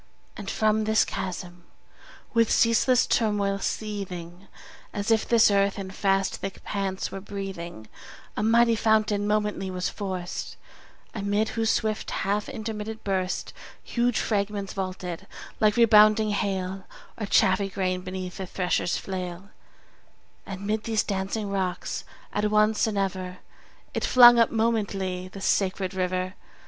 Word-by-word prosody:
And 200 -3 -6
from 215 0 +1
this 220 0 +3
chasm, 180 -1 -5 0.7
with 230 -2 +3
ceaseless 235 +2 +4
turmoil 205 -3 +1
seething, 190 -4 -5 0.5
As 205 +2 -1
if 220 -1 +2
this 230 -3 +5
earth 200 0 +2
in 190 -1 -5
fast 195 0 +1
thick 195 - -7
pants 195 -2 -3
were 195 - -6
breathing, 190 - -7 0.5
A - - -2
mighty 230 +1 +4
fountain 215 -2 +2
momently 210 -2 0
was 185 -1 -2
forced; 185 -3 -5 0.6
Amid 205 +1 0
whose 225 -1 -1
swift 215 -1 0
half 205 +1 -1
intermitted 220 0 -5
burst 190 -2 -2 0.3
20 - - -12
Huge 240 -1 +2
fragments 200 -2 -1
vaulted 185 -1 -5 0.3
like 210 -1 +3
rebounding 215 -1 +6
hail, 190 -2 -2 0.3
Or 210 - -3
chaffy 195 0 +3
grain 185 -1 -1
beneath 185 -1 -6
the 190 - -5
thresher's 180 -1 0
flail: 185 0 -6 1.0
And 195 0 -6
'mid 215 +1 -1
these 220 -1 +1
dancing 200 +1 -2
rocks 185 -2 -2 0.3
at 210 +1 +1
once 215 +1 +3
and 215 -2 -2
ever 185 -2 -2 0.6
It - - -2
flung 240 -1 +8
up 230 - +5
momently 200 -5 -1
the 195 +1 -10
sacred 190 -1 0
river. 185 0 -1
200 Hz, 135 wpm, -26 LUFS, 185-215 Hz, 1.0 s, flung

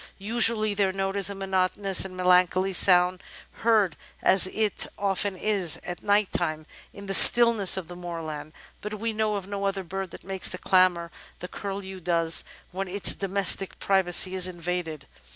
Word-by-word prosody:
UsuaUy, 215 0 +2
their 195 -2 0
note 195 0 -4
is 200 0 0
a 200 - -7
monotonous 195 0 -1
and 185 -1 -8
melancholy 185 +1 +1
sound, 180 -1 +3 0.4
heard, 220 -6 +1 0.3
as 190 -1 +5
it 215 +1 -2
often 195 -1 -2
is, 195 -5 -2
at 175 0 -8
night 205 -1 0
time 155 -2 -4 0.3
in 200 - -13
the 195 - -5
stillness 230 -4 +7
of 185 -4 -7
the 175 - -11
moorland, 165 -4 -8 0.3
but 210 +1 -7
we 225 +2 -5
know 215 -1 -2
of 200 -2 -6
no 200 0 -6
other 195 -1 -3
bird 190 +1 -7
that - - -13
makes 190 0 -2
the 180 - -7
clamour 180 -3 0 0.3
the 180 - -9
Curlew 195 -1 -8
does 170 -1 +1 0.3
when 190 +1 -6
its 195 +2 +4
domestic 195 0 -2
privacy 190 -1 +3
is 185 -1 +2
invaded. 175 -3 -6
190 Hz, 170 wpm, -24 LUFS, 180-200 Hz, 0.4 s, stillness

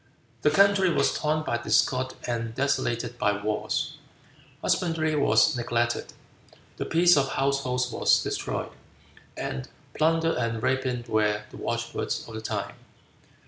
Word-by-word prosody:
The - - +4
country 195 +3 +4
was - - +2
torn 155 0 0
by 120 -5 -1
discord 130 +2 +1
and 115 -1 -3
desolated 120 -3 -1
by 105 0 +1
wars. 105 +1 -2 0.7
Husbandry 165 -3 +1
was 145 +1 +4
neglected, 120 0 -1 0.6
the - - -3
peace 175 +2 +5
of 135 -2 +2
households 130 -2 0
was - - +3
destroyed, - - -3 0.7
and 65 -1 -4 0.2
plunder 165 +1 +2
and 115 -1 -2
rapine 130 -2 0
were 105 -1 +1
the - - -10
watchwords - - -3
of 115 - -10
the 110 - -5
time. 110 - -3
130 Hz, 130 wpm, -26 LUFS, 115-155 Hz, 0.7 s, peace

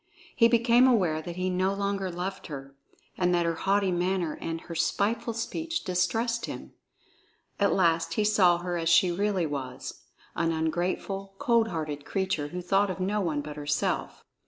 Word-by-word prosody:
He 230 - +6
became 235 +2 +5
aware 180 -11 +2
that 170 +1 -7
he 185 +1 -1
no 185 +2 +1
longer 200 -1 -1
loved 180 +2 -5
her, 140 -2 -8 0.4
and 180 -1 +3
that 170 -1 +1
her 165 - +1
haughty 195 +3 +1
manner 175 -2 0
and 165 0 -4
her 170 - -8
spiteful 205 +8 0
speech 325 +8 -3
distressed 225 +7 0
him. - - -8 0.9
At 200 -1 +3
last 165 -2 +2
he 215 - +2
saw 190 -5 +4
her 175 0 -3
as 165 0 0
she 170 +2 +5
really 195 -1 0
was, 135 -4 -5 0.3
an 165 -1 +1
ungrateful, 180 +4 -2
cold 235 -3 +3
hearted 155 -6 -4
creature 190 -6 -1
who 180 +3 -6
thought 195 +2 +2
of 185 - -4
no 200 +3 0
one 155 -5 -1
but 150 0 -8
herself. 145 0 -2
180 Hz, 170 wpm, -28 LUFS, 165-200 Hz, 0.9 s, He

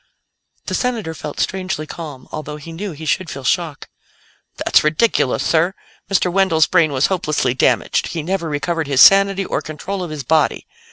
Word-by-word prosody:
The - - -4
Senator 230 -10 -1
felt 150 -1 -7
strangely 185 -5 -2
calm, 150 -5 -9
although 150 -1 -6
he 150 +3 -10
knew 185 +3 -5
he 155 +2 -9
should 185 +2 -1
feel 135 - -7
shock. 155 +2 -1 0.7
"That's - - +3
ridiculous, 155 - +1
sir! 170 +4 +2 0.3
Mr. 180 -2 +1
Wendell's 190 -5 +3
brain 165 -4 +2
was 130 0 +2
hopelessly 155 -9 0
damaged; 130 - +1
he 165 -2 -4
never 175 -1 -2
recovered 160 +2 -2
his 135 -2 0
sanity 195 0 +6
or - - -2
control 165 +5 -5
of 175 - -4
his 150 -2 -5
body. 155 +3 +1
165 Hz, 170 wpm, -19 LUFS, 150-190 Hz, 0.7 s, sanity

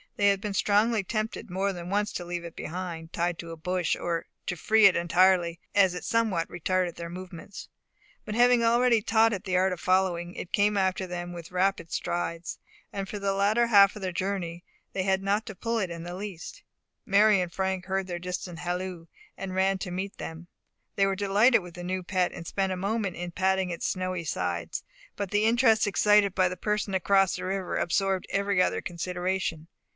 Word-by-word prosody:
They 200 -1 +4
had 200 -1 +1
been 210 -1 -3
strongly 210 +2 +2
tempted 215 +2 -3
more 195 +2 -1
than 175 -1 -7
once 205 +2 0
to 175 - -4
leave 175 0 -4
it 170 -1 -9
behind, 170 -1 -6
tied 175 0 -1
to 165 -1 -7
a - - -6
bush, 180 +1 -1
or 170 -1 -2 0.2
to 180 - -1
free 220 +5 +4
it 195 - +7
entirely, 175 0 +3 0.2
as 190 -3 +5
it 180 - -6
somewhat 215 -8 +1
retarded 180 0 -1
their 170 0 -6
movements; 180 +1 -9 0.6
but 210 - -4
having 245 0 +5
already 235 0 +4
taught 225 +1 +3
it 200 +1 -5
the 185 -1 +1
art 185 0 +2
of 180 - -7
following, 180 0 +1
it 180 - -7
came 205 +1 +3
after 190 -1 0
them 175 0 -5
with 170 -1 -9
rapid 185 -2 0
strides, 170 -1 -3 0.3
and 195 -1 -4
for 210 - -5
the 195 0 0
latter 210 +4 +2
half 200 -3 +6
of 210 - -8
their 185 - -1
journey 180 -2 -3 0.3
they 190 - -1
had 190 0 +1
not 205 +2 +1
to 215 - -7
pull 230 +4 -2
it 190 -4 -1
in 170 -1 -6
the 175 +1 -6
least. 200 - -7 0.4
Mary 205 +1 +5
and 175 -1 -3
Frank 190 0 -1
heard 190 0 -1
their 175 -1 -4
distant 180 -1 -5
halloo, 180 -1 -4 0.3
and 185 -1 -5
ran 190 +1 +2
to 180 -1 -5
meet 190 +2 -4
them. 165 +2 -7 0.5
They 195 - +3
were 195 - 0
delighted 205 +5 +4
with 175 -1 -11
the 175 - -7
new 185 +1 -2
pet, 180 -1 0
and 170 - -8
spent 195 +2 -1
a 185 - -2
moment 200 0 -1
in 175 0 -5
patting 190 +1 +1
its 170 - -3
snowy 185 -2 -2
sides; 90 - -3 0.3
but 200 -2 -4
the 205 +1 +2
interest 225 -2 +4
excited 205 -1 +4
by 185 -1 +4
the 185 - -6
person 210 +1 -1
across 195 0 +3
the - - -5
river 190 -1 -2
absorbed 190 +2 0
every 200 -1 +1
other - - +1
consideration. 175 -1 -3
190 Hz, 205 wpm, -27 LUFS, 175-200 Hz, 0.6 s, it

